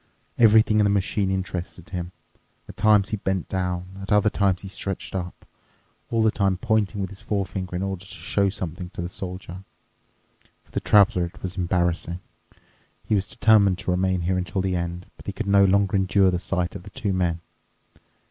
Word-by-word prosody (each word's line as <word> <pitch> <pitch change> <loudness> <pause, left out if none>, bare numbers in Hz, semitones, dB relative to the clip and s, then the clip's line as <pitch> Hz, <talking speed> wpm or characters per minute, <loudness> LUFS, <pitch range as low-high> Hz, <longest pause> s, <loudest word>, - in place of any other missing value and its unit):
Everything 110 -1 +6
in - - +5
the 100 - +3
machine 100 0 0
interested 90 -2 -4
him. 90 -1 -4 0.6
At - - -10
times 105 -1 +4
he 110 - -2
bent 95 -2 -2
down—at 95 +1 -4
other 105 0 +4
times 95 -2 +1
he - - -6
stretched 95 0 -5
up, 90 -1 -5 0.6
all 115 -1 +2
the 110 - +4
time 95 -3 +1
pointing 110 -2 0
with 95 0 -3
his 100 - -11
forefinger 95 -2 -3
in 90 - -2
order 95 -2 -3
to - - -11
show 95 +3 0
something 90 -2 -5
to - - -4
the - - -2
Soldier. 90 0 -7 1.0
For - - -27
the - - -1
Traveler 95 -4 +4
it 85 - -12
was 95 -1 -4
embarrassing. 90 -1 0 0.9
He - - -1
was 100 -2 +1
determined 105 -5 +4
to 95 -1 -2
remain 95 0 +1
here 90 +2 0
until 90 +1 -2
the 95 -1 -1
end, 85 +1 -3
but - - -15
he - - -3
could - - -4
no 100 0 +5
longer 100 0 +2
endure 95 0 +3
the 90 - -1
sight 90 -2 -2
of - - -6
the 100 - -11
two 100 0 -2
men. 85 -2 0
95 Hz, 190 wpm, -24 LUFS, 90-100 Hz, 1.0 s, Everything